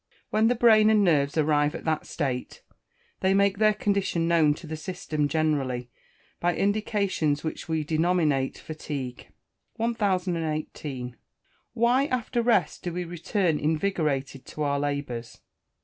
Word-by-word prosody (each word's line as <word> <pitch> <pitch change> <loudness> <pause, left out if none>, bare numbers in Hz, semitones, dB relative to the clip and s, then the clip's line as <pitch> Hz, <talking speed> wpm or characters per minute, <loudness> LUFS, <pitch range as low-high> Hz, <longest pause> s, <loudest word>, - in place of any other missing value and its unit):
When 220 +1 +3
the 245 - +2
brain 220 -2 +6
and 215 -2 +4
nerves 145 -5 +2
arrive 150 -1 +2
at - - -7
that 155 -1 -1
state, 130 -5 -3 0.6
they 190 0 +2
make 200 0 +2
their 215 -1 +4
condition 200 -5 0
known 160 -3 +4
to 170 - -11
the 160 0 -5
system 155 -3 -2
generally, 135 -5 -1 0.5
by 175 -1 +1
indications 200 -7 0
which 160 +1 -5
we 160 -1 0
denominate 155 -3 +1
fatigue. 140 -5 -6 0.5
1018. 165 - -2 0.6
_Why, 250 +5 +3
after 240 -1 -1
rest, 230 -6 +1
do 175 - -4
we 180 +1 -3
return 170 0 -1
invigorated 150 -5 -1
to 155 - -4
our 140 -1 0
labours? 140 -5 -4
160 Hz, 135 wpm, -26 LUFS, 145-200 Hz, 0.6 s, brain